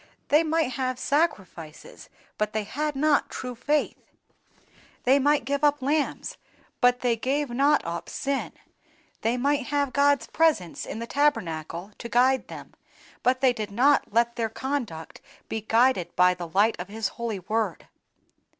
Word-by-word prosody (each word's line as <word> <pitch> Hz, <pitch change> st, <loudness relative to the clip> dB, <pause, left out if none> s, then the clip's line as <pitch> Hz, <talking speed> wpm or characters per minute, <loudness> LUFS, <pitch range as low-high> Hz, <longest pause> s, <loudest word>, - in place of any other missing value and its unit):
They 300 Hz, +2 st, +5 dB
might 320 Hz, -3 st, +1 dB
have 255 Hz, 0 st, -2 dB
sacrifices 205 Hz, -, -3 dB, 0.3 s
but 215 Hz, 0 st, -1 dB
they 215 Hz, -1 st, -1 dB
had 295 Hz, +7 st, -3 dB
not 295 Hz, +1 st, +2 dB
true 250 Hz, -1 st, -6 dB
faith; 290 Hz, +5 st, -1 dB, 1.0 s
they 265 Hz, +3 st, +4 dB
might 290 Hz, -2 st, +2 dB
give 280 Hz, +2 st, -2 dB
up 290 Hz, 0 st, +3 dB
lambs, 290 Hz, +3 st, -1 dB, 0.4 s
but 245 Hz, 0 st, +3 dB
they 245 Hz, -2 st, +2 dB
gave 270 Hz, +4 st, -1 dB
not 280 Hz, +4 st, +2 dB
up 170 Hz, 0 st, -5 dB
sin; 275 Hz, 0 st, -3 dB, 0.7 s
they 230 Hz, +3 st, 0 dB
might 280 Hz, +1 st, 0 dB
have 285 Hz, -2 st, 0 dB
God's 285 Hz, -4 st, +3 dB
presence 295 Hz, -, 0 dB
in -, -, -5 dB
the 230 Hz, -, -4 dB
tabernacle 180 Hz, -, -1 dB
to 235 Hz, -, -7 dB
guide 255 Hz, +2 st, +3 dB
them, -, -, -10 dB, 0.5 s
but 255 Hz, +1 st, +1 dB
they 260 Hz, -2 st, +4 dB
did 215 Hz, -3 st, -5 dB
not 260 Hz, +7 st, +2 dB
let 235 Hz, +2 st, +1 dB
their 225 Hz, -1 st, -1 dB
conduct 230 Hz, -, -5 dB, 0.3 s
be 220 Hz, -, -3 dB
guided 225 Hz, -5 st, +2 dB
by 180 Hz, 0 st, +5 dB
the 175 Hz, -1 st, -7 dB
light 200 Hz, +6 st, +2 dB
of 180 Hz, -, -5 dB
His 215 Hz, 0 st, -3 dB
holy 235 Hz, -3 st, -4 dB
Word." 210 Hz, 0 st, -2 dB
245 Hz, 155 wpm, -26 LUFS, 215-285 Hz, 1.0 s, They